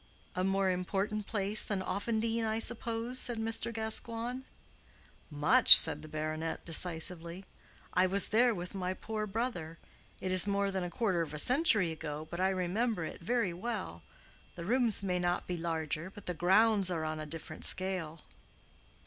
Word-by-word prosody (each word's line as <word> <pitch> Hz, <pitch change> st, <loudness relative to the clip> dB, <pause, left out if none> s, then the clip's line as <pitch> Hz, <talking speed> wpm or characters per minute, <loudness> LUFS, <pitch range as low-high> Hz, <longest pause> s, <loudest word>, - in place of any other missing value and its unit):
"A 185 Hz, +1 st, -2 dB
more 195 Hz, 0 st, 0 dB
important 195 Hz, +3 st, -3 dB
place 205 Hz, 0 st, +5 dB
than 195 Hz, -3 st, -2 dB
Offendene, 225 Hz, +4 st, -2 dB
I 220 Hz, 0 st, -1 dB
suppose?" 230 Hz, +1 st, -1 dB
said 240 Hz, -2 st, 0 dB
Mr. 225 Hz, +1 st, -3 dB
Gascoigne. 230 Hz, +2 st, -3 dB, 0.9 s
"Much," 160 Hz, -, +8 dB
said 155 Hz, -2 st, +2 dB
the 155 Hz, -, -10 dB
baronet, 155 Hz, +1 st, -5 dB
decisively. 170 Hz, +2 st, -1 dB, 0.5 s
"I 185 Hz, +1 st, +3 dB
was 195 Hz, +1 st, +3 dB
there 240 Hz, +3 st, +3 dB
with 175 Hz, +1 st, -7 dB
my 185 Hz, -1 st, -3 dB
poor 215 Hz, 0 st, -5 dB
brother—it 190 Hz, -4 st, -6 dB
is 185 Hz, +2 st, +6 dB
more 200 Hz, 0 st, 0 dB
than 190 Hz, -1 st, -3 dB
a 175 Hz, -, -4 dB
quarter 185 Hz, -2 st, -1 dB
of 155 Hz, -2 st, -5 dB
a -, -, -5 dB
century 225 Hz, -, +3 dB
ago, 155 Hz, -1 st, -7 dB
but 170 Hz, -, -5 dB
I 190 Hz, +1 st, +2 dB
remember 190 Hz, +1 st, -2 dB
it -, -, -9 dB
very 215 Hz, -1 st, -1 dB
well. 185 Hz, -, -6 dB, 0.5 s
The 170 Hz, -, -8 dB
rooms 235 Hz, -1 st, +1 dB
may 180 Hz, -2 st, -1 dB
not 175 Hz, 0 st, -1 dB
be 180 Hz, -, -4 dB
larger, 165 Hz, 0 st, -3 dB
but 205 Hz, +1 st, -14 dB
the 180 Hz, -, -3 dB
grounds 195 Hz, +4 st, +3 dB
are 165 Hz, -3 st, -3 dB
on 155 Hz, 0 st, -4 dB
a 155 Hz, -, -7 dB
different 155 Hz, 0 st, -9 dB
scale." 185 Hz, -4 st, -3 dB
190 Hz, 165 wpm, -31 LUFS, 170-220 Hz, 0.9 s, Much